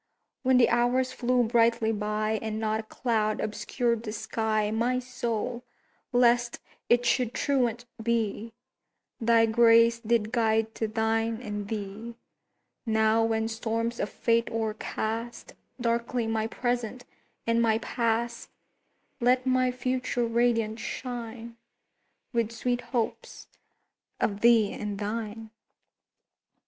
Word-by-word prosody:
When 260 Hz, -1 st, +4 dB
the 245 Hz, -, +6 dB
Hours 245 Hz, +2 st, +2 dB
flew 250 Hz, -1 st, +1 dB
brightly 230 Hz, -1 st, +3 dB
by 215 Hz, +1 st, -1 dB
And 220 Hz, -1 st, -3 dB
not 220 Hz, 0 st, 0 dB
a 220 Hz, -, -8 dB
cloud 215 Hz, -4 st, 0 dB
obscured 235 Hz, +2 st, -1 dB
the 220 Hz, -2 st, -5 dB
sky, 220 Hz, -1 st, -1 dB
My 235 Hz, +3 st, +1 dB
soul, 245 Hz, -1 st, -3 dB, 0.5 s
lest 240 Hz, -1 st, +3 dB, 0.3 s
it 240 Hz, 0 st, +4 dB
should 245 Hz, 0 st, +1 dB
truant 245 Hz, -4 st, 0 dB, 0.2 s
be, 225 Hz, -1 st, -1 dB, 0.7 s
Thy 230 Hz, 0 st, +4 dB
grace 230 Hz, +1 st, +5 dB
did 225 Hz, -2 st, 0 dB
guide 225 Hz, -2 st, +1 dB
to 220 Hz, -, -2 dB
thine 225 Hz, +1 st, 0 dB
and 210 Hz, -4 st, -5 dB
thee; 215 Hz, +2 st, -5 dB, 0.7 s
Now, 220 Hz, 0 st, +3 dB
when 225 Hz, 0 st, 0 dB
storms 230 Hz, +1 st, -2 dB
of 210 Hz, -, -1 dB
Fate 230 Hz, 0 st, +1 dB
o'ercast 225 Hz, +1 st, -3 dB, 0.3 s
Darkly 235 Hz, 0 st, 0 dB
my 225 Hz, 0 st, -1 dB
Present 245 Hz, +1 st, -2 dB, 0.4 s
and 230 Hz, 0 st, +2 dB
my 220 Hz, -1 st, +3 dB
Past, 235 Hz, 0 st, -2 dB, 0.7 s
Let 250 Hz, +1 st, +3 dB
my 255 Hz, 0 st, +3 dB
Future 250 Hz, -1 st, -1 dB
radiant 230 Hz, -1 st, +1 dB
shine 235 Hz, -1 st, -6 dB, 0.8 s
With 230 Hz, -2 st, 0 dB
sweet 245 Hz, +1 st, -1 dB
hopes 240 Hz, -3 st, -4 dB, 0.7 s
of 205 Hz, -1 st, -1 dB
thee 230 Hz, -3 st, +5 dB
and 205 Hz, -1 st, -4 dB
thine! 215 Hz, +1 st, -4 dB
230 Hz, 115 wpm, -28 LUFS, 220-240 Hz, 0.8 s, the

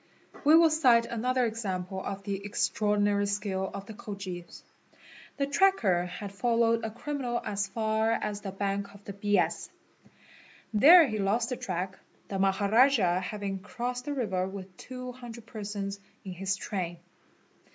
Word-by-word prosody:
' -, -, -19 dB
We 305 Hz, +2 st, +8 dB
will 330 Hz, -1 st, +6 dB
cite 250 Hz, -7 st, +5 dB
another 250 Hz, +2 st, 0 dB
example 190 Hz, -4 st, -3 dB
of 195 Hz, 0 st, -5 dB
the 200 Hz, -1 st, -4 dB
extraordinary 205 Hz, 0 st, +1 dB
skill 200 Hz, -2 st, -2 dB
of 200 Hz, 0 st, -7 dB
the 220 Hz, -, -9 dB
Khojis. 195 Hz, -6 st, -7 dB, 0.7 s
~The 280 Hz, -, +1 dB
tracker 275 Hz, -, +3 dB
had 195 Hz, +3 st, -7 dB
followed 230 Hz, +1 st, +2 dB
a 225 Hz, -, -2 dB
criminal 245 Hz, 0 st, -3 dB
as 200 Hz, -1 st, -1 dB
far 220 Hz, +2 st, +1 dB
as 210 Hz, -2 st, -2 dB
the 195 Hz, -, -5 dB
bank 200 Hz, +1 st, -3 dB
of 200 Hz, -, -15 dB
the 200 Hz, -, -6 dB
Bias. 205 Hz, +1 st, 0 dB, 1.0 s
"There 320 Hz, +11 st, +9 dB
he 215 Hz, -3 st, -3 dB
lost 215 Hz, +4 st, +1 dB
the 250 Hz, -, -1 dB
track, 185 Hz, -2 st, -4 dB, 0.3 s
the 195 Hz, -, -3 dB
Maharajah 200 Hz, 0 st, +4 dB
having 195 Hz, +1 st, -4 dB
crossed 245 Hz, +5 st, -4 dB
the 290 Hz, -, -3 dB
river 190 Hz, -8 st, -1 dB
with 190 Hz, -1 st, -8 dB
200 250 Hz, -2 st, -8 dB
persons 205 Hz, -2 st, -5 dB, 0.3 s
in 190 Hz, -, -5 dB
his 195 Hz, +2 st, -1 dB
train. 180 Hz, -4 st, -4 dB
205 Hz, 150 wpm, -29 LUFS, 195-235 Hz, 1.0 s, There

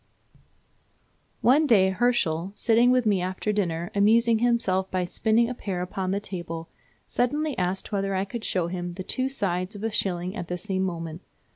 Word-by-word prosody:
"One 290 Hz, +5 st, +4 dB
day 195 Hz, -6 st, +5 dB
Herschel, 190 Hz, -5 st, 0 dB
sitting 235 Hz, +2 st, +4 dB
with 250 Hz, -1 st, +3 dB
me 200 Hz, -4 st, +2 dB
after 185 Hz, +3 st, -2 dB
dinner, 175 Hz, -4 st, -1 dB
amusing 225 Hz, +3 st, +4 dB
himself 230 Hz, -6 st, +1 dB
by 185 Hz, -1 st, -1 dB
spinning 220 Hz, +6 st, +2 dB
a 250 Hz, -, -3 dB
pear 190 Hz, -6 st, -4 dB
upon 185 Hz, +1 st, -3 dB
the 195 Hz, +2 st, 0 dB
table, 170 Hz, -4 st, -6 dB, 0.4 s
suddenly 290 Hz, +4 st, 0 dB
asked 185 Hz, +1 st, -2 dB
whether 195 Hz, -1 st, -1 dB
I 190 Hz, +1 st, 0 dB
could 220 Hz, +3 st, -6 dB
show 180 Hz, -6 st, 0 dB
him 175 Hz, 0 st, -4 dB
the 185 Hz, -, -5 dB
two 260 Hz, +7 st, -1 dB
sides 190 Hz, -6 st, -1 dB
of 205 Hz, -, -8 dB
a 225 Hz, -, -1 dB
shilling 180 Hz, -1 st, -1 dB
at 175 Hz, -, -5 dB
the 180 Hz, -, -3 dB
same 190 Hz, 0 st, -2 dB
moment. 165 Hz, -2 st, -5 dB
195 Hz, 175 wpm, -26 LUFS, 180-230 Hz, 0.4 s, day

